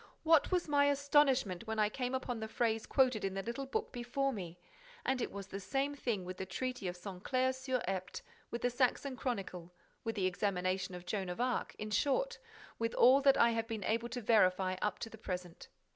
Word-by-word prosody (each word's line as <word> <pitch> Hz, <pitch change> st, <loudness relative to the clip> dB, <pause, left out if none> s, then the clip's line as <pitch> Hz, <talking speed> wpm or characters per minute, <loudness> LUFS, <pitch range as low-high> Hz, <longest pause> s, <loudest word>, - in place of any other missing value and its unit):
What 325 Hz, 0 st, +5 dB
was 360 Hz, -2 st, +1 dB
my 285 Hz, -1 st, +4 dB
astonishment 275 Hz, -8 st, +3 dB
when 220 Hz, 0 st, -2 dB
I 210 Hz, -1 st, +4 dB
came 250 Hz, +4 st, -2 dB
upon 245 Hz, -2 st, -3 dB
the 220 Hz, -, -4 dB
phrase 225 Hz, -1 st, 0 dB
quoted 255 Hz, -5 st, +3 dB
in 195 Hz, -1 st, -1 dB
the 195 Hz, -, -2 dB
little 250 Hz, +5 st, -4 dB
book 440 Hz, -, -2 dB
before 260 Hz, +2 st, -1 dB
me! 180 Hz, -5 st, -6 dB, 0.5 s
And 265 Hz, -1 st, +1 dB
it -, -, -2 dB
was 200 Hz, -1 st, -6 dB
the 195 Hz, 0 st, -6 dB
same 275 Hz, +7 st, -1 dB
thing 235 Hz, -9 st, -2 dB
with 185 Hz, 0 st, -6 dB
the 190 Hz, -, -4 dB
Treaty 250 Hz, 0 st, -3 dB
of 175 Hz, 0 st, -4 dB
Saint 185 Hz, 0 st, -8 dB
Clair 260 Hz, 0 st, +2 dB
sur 260 Hz, -1 st, -2 dB
Epte, 185 Hz, -1 st, -3 dB, 0.3 s
with 235 Hz, -, -5 dB
the 245 Hz, -, +2 dB
Saxon 260 Hz, +2 st, +1 dB
Chronicle, 195 Hz, -9 st, -4 dB, 0.3 s
with 225 Hz, -1 st, -2 dB
the 195 Hz, -3 st, 0 dB
examination 185 Hz, -1 st, -1 dB
of 180 Hz, 0 st, -9 dB
Joan 190 Hz, 0 st, -2 dB
of 180 Hz, -, -5 dB
Arc, 250 Hz, 0 st, -1 dB
in 215 Hz, 0 st, -5 dB
short, 475 Hz, -, +1 dB, 0.4 s
with 230 Hz, 0 st, -1 dB
all 260 Hz, +3 st, +7 dB
that 275 Hz, -1 st, +5 dB
I 235 Hz, -, +5 dB
have 225 Hz, -1 st, -1 dB
been 225 Hz, -3 st, -4 dB
able 230 Hz, +3 st, 0 dB
to 245 Hz, +1 st, -4 dB
verify 185 Hz, -4 st, +3 dB
up 210 Hz, -, 0 dB
to -, -, -10 dB
the 220 Hz, -, -11 dB
present. 180 Hz, -4 st, -6 dB
230 Hz, 215 wpm, -34 LUFS, 195-260 Hz, 0.5 s, all